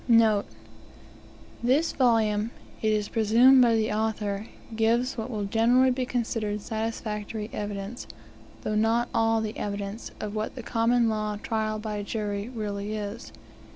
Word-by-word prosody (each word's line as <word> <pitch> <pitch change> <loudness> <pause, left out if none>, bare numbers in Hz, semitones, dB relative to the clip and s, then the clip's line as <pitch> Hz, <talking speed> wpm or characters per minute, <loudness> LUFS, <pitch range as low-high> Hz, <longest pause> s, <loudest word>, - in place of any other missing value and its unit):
NOTE 225 -4 +4 1.1
This 270 +7 +2
volume, 225 -4 +2 0.3
it 220 - +2
is 210 -1 0
presumed 235 +4 +5
by 235 -2 +5
the 220 -1 +1
author, 210 -1 -1 0.3
gives 230 +3 +2
what 225 +1 -4
will 215 -4 -3
generally 240 +5 +4
be 250 0 -1
considered 225 -4 -1
satisfactory 220 -1 -4
evidence, 205 +2 -5 0.6
though 215 - -1
not 225 +3 +2
all 225 0 +2
the 215 -1 -4
evidence, 200 +1 -4
of 210 -1 -4
what 215 0 -3
the 250 - -7
Common 235 +1 +2
Law 215 -1 -1
trial 220 -1 -1
by 210 -1 -4
jury 205 0 -3
really 210 -3 -4
is. 210 +1 -6
220 Hz, 140 wpm, -27 LUFS, 210-230 Hz, 1.1 s, presumed